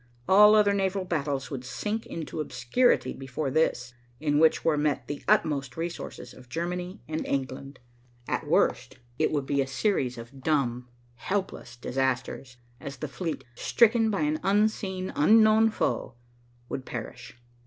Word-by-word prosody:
All 210 +2 +7
other 205 -1 +4
naval 195 -1 0
battles 145 -5 -2
would 130 -3 -5
sink 210 - -4
into 160 -1 -6
obscurity 155 - +1
before 135 +1 -4
this, 125 -6 0 0.3
in 145 -1 +1
which 160 0 +3
were 160 - +3
met 150 -1 0
the 145 - -6
utmost 150 - +1
resources 170 +1 -6
of 125 -1 -16
Germany 180 - -4
and 155 0 -3
England. 135 0 -3 0.5
At - - -2
worst, - - +1 0.2
it 155 - +3
would 145 -3 -1
be 140 0 +1
a 135 - -2
series 135 - 0
of 120 +4 -11
dumb, 125 -5 0 0.3
helpless 185 -6 -3
disasters, 125 0 -2 0.2
as 140 -1 -7
the 150 - -4
fleet, 160 0 -4
stricken 225 - +3
by 195 -6 -1
an 150 +1 0
unseen, 195 -2 0
unknown 220 +6 +5
foe, 170 - -2 0.5
would 130 - -5
perish. 120 0 -8
150 Hz, 145 wpm, -27 LUFS, 130-190 Hz, 0.5 s, All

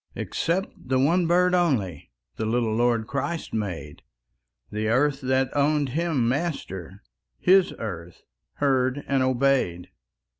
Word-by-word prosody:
Except 180 +4 -1
the 130 +1 -2
one 165 +6 +3
bird 180 +1 +3
only 125 - 0 0.3
The 110 - -2
little 115 -1 0
Lord 120 -1 +1
Christ 140 +7 -3
made; 90 -9 -4 0.7
The 105 +1 -2
earth 135 +5 +2
that 130 0 0
owned 145 0 +2
Him 150 -4 0
Master, 115 - -3 0.3
His 190 0 +4
earth 85 -6 -7 0.3
heard 135 -1 +1
and 135 -1 +1
obeyed. 130 -9 +1
130 Hz, 120 wpm, -25 LUFS, 110-150 Hz, 0.7 s, His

